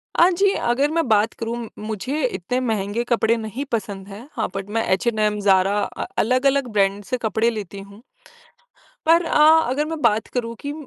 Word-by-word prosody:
अ, 345 - +6
जी 385 +2 +2 0.2
अगर 280 +4 +1
मैं 330 -4 0
बात 215 +1 +3
करूँ, 230 0 -5
मुझे 220 +8 -3
इतने 245 +2 -2
महँगे 215 0 -1
कपड़े 230 -1 +3
नहीं 225 +4 -5
पसंद 200 -3 -3
हैं। 210 +6 -10
हाँ, - - -1
बट 195 0 -5
मैं 225 - +2
H&M, 215 0 0
ZARA 190 0 +4 0.3
अ, - - -3 0.2
अलग-अलग 265 +3 +2
ब्रांड 200 0 +1
से 255 +5 -3
कपड़े 220 0 0
लेती 205 -4 -6
हूँ। 200 +2 -13 1.1
पर 335 +2 +5
अ 300 -2 +4 0.2
अगर 285 +4 0
मैं 320 0 -5
बात 220 -2 +2
करूँ 230 -2 -2
कि 285 - -4
225 Hz, 175 wpm, -22 LUFS, 205-260 Hz, 1.1 s, अ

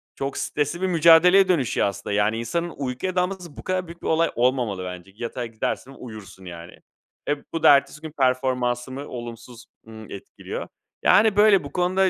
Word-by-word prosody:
Çok 135 0 -4
stresli 150 +4 -2
bir 190 - +1
mücadeleye 175 +3 +6
dönüşüyor 145 - +1
aslında. 100 +1 -5
Yani, 105 +2 +1
insanın 170 +9 -3
uykuya 140 +7 -3
dalması 180 -3 -2
bu - - -9
kadar 185 -1 -2
büyük 170 +1 -12
bir - - -5
olay 165 +1 +2
olmamalı 120 -6 0
bence. 90 +1 -8
Yatağa 120 +2 -5
gidersin, 115 +3 -4
uyursun, 105 -5 -11
yani. 85 -1 -9 0.6
E, 145 - +1 0.2
bu 165 - -3
da - - +9
ertesi 140 +2 -2
gün 155 -1 -8
performansımı 130 0 0
olumsuz, 120 -1 -9 0.2
ımm, 110 -1 -11
etkiliyor. 100 - -7 0.4
Yani, 215 -1 +5
böyle 205 -2 +5
bu - - -9
konuda 185 +1 +2
135 Hz, 170 wpm, -23 LUFS, 115-170 Hz, 0.6 s, da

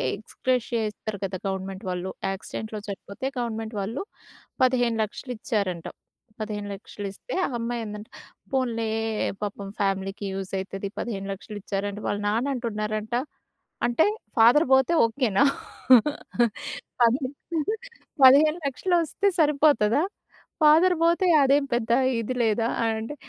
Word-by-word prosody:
ఎక్సగ్రేషియా 245 -3 -1
ఇస్తారు 210 0 -6
కదా, 190 -1 -4
గవర్నమెంట్ 190 +1 -4
వాళ్ళు. 180 +1 -3 0.2
యాక్సిడెంట్‌లో 215 +3 -6
చనిపోతే 200 +4 -7
గవర్నమెంట్ 225 -2 -3
వాళ్ళు 225 - -3 0.6
15,00,000 245 -1 +1
ఇచ్చారంట. 200 -8 -2 0.5
15,00,000 205 -1 -5
ఇస్తే, - - -9
ఆ - - -1
అమ్మాయి 235 0 -2
అందంట 210 +1 -7 0.4
"పోన్లే 235 -4 0 0.5
పాపం 200 -1 -4
ఫ్యామిలీకి 195 0 -1
యూజ్ 190 -1 -5
అవుతది 195 +1 -5
15,00,000 195 -1 -5
ఇచ్చారంట." 200 +1 -3
వాళ్ళ 205 - -1
నాన్న 225 +6 +1
అంటున్నారంట, 215 -2 -3 0.7
"అంటే 240 +6 +3 0.3
ఫాదర్ 240 +8 +6
పోతే 265 +5 +4
ఓకేనా? 230 -1 +2 1.6
పదిహేను 255 +4 +2 0.9
పదిహేను 305 +5 +7
లక్షలు 315 +7 0
వస్తే 360 +5 -1
సరిపోతదా? 290 -6 +4 0.6
ఫాదర్ 325 +5 +6
పోతే 340 +3 +3 0.2
అదేం 275 +1 +4
పెద్ద 235 -1 0 0.3
ఇది 250 +3 -3
లేదా?" 225 +1 +2 0.2
అని 225 -1 +1
అంటే 230 +7 -6
225 Hz, 110 wpm, -25 LUFS, 205-260 Hz, 1.6 s, పదిహేను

